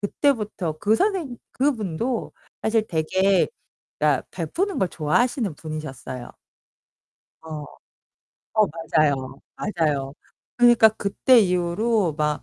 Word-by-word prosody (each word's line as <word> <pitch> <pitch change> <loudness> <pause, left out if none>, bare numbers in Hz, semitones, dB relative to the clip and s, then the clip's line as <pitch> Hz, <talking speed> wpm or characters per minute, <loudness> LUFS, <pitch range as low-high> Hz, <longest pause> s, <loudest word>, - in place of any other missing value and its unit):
그때부터 210 - 0
그 215 +1 +2
선생님 335 - 0 0.2
그분도 235 - -1 0.3
사실 220 0 +1
되게 185 +3 +2 0.5
그러니까 - - +1
베푸는 390 +1 -2
걸 190 -3 +1
좋아하시는 210 - 0
분이셨어요. 145 -5 -7 1.1
어. 155 -2 -7 0.9
어 215 -1 +4
맞아요. 155 -3 +1 0.4
맞아요. 150 -8 -1 0.4
그니까 240 -2 +7
그때 220 +4 +3
이후로 180 0 +1
막 150 -1 0
195 Hz, 240 characters per minute, -23 LUFS, 155-235 Hz, 1.1 s, 그니까